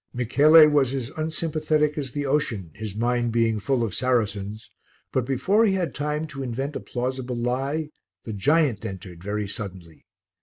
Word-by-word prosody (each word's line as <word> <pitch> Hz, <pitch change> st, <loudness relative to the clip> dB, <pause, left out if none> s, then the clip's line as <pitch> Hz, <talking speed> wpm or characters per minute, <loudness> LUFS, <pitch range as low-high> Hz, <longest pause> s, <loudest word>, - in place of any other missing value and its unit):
Michele 150 Hz, +6 st, +6 dB
was 140 Hz, -3 st, +2 dB
as 130 Hz, -1 st, -4 dB
unsympathetic 155 Hz, -1 st, 0 dB
as 140 Hz, -4 st, -4 dB
the 145 Hz, +2 st, -3 dB
ocean, 120 Hz, -, -1 dB
his 110 Hz, -3 st, -6 dB
mind 120 Hz, +1 st, 0 dB
being 115 Hz, -1 st, +1 dB
full 125 Hz, +3 st, 0 dB
of 110 Hz, -5 st, -2 dB
Saracens; 110 Hz, -4 st, -1 dB, 0.4 s
but 130 Hz, -2 st, 0 dB
before 190 Hz, -, +2 dB
he 205 Hz, -4 st, +3 dB
had 185 Hz, -3 st, -1 dB
time 150 Hz, +2 st, -2 dB
to 140 Hz, -3 st, -7 dB
invent 135 Hz, +3 st, -3 dB
a -, -, -2 dB
plausible 125 Hz, 0 st, -3 dB
lie, 135 Hz, +6 st, -1 dB, 0.3 s
the 110 Hz, -, -6 dB
giant 135 Hz, +1 st, +2 dB
entered 90 Hz, -4 st, -8 dB
very 105 Hz, +1 st, -2 dB
suddenly. 95 Hz, -6 st, -7 dB
130 Hz, 160 wpm, -25 LUFS, 110-150 Hz, 0.4 s, Michele